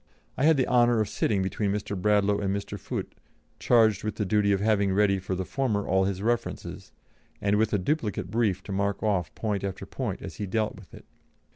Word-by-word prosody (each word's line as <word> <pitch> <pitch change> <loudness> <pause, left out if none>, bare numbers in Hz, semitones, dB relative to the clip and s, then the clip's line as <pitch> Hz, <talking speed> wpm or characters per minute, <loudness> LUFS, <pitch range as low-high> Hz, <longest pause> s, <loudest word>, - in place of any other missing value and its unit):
I 135 - +1
had 160 -1 +5
the 130 - +2
honour 120 -2 +4
of 110 - +1
sitting 100 -2 0
between 100 +1 -1
Mr. 100 0 -3
Bradlaugh 105 +1 +2
and 100 -2 -1
Mr. 100 0 -5
Foote, - - -5 0.5
charged 110 -4 +3
with 110 - -3
the 105 - -1
duty 100 +1 +2
of 100 - +2
having 100 -1 +2
ready 100 -1 +3
for 95 0 -3
the 95 0 -3
former 110 -6 -1
all 95 0 +3
his 95 0 -2
references, 120 +1 -3 0.5
and 100 0 +1
with 110 0 +2
a 105 - +2
duplicate 105 - -2
brief 105 -5 0
to - - -8
mark 100 +2 -1
off 95 -7 0
point 105 -3 -2
after 95 -2 -4
point - - -4
as - - -8
he 105 - -4
dealt 110 +3 -1
with 100 -5 -15
it. - - -14
105 Hz, 215 wpm, -27 LUFS, 100-110 Hz, 0.5 s, had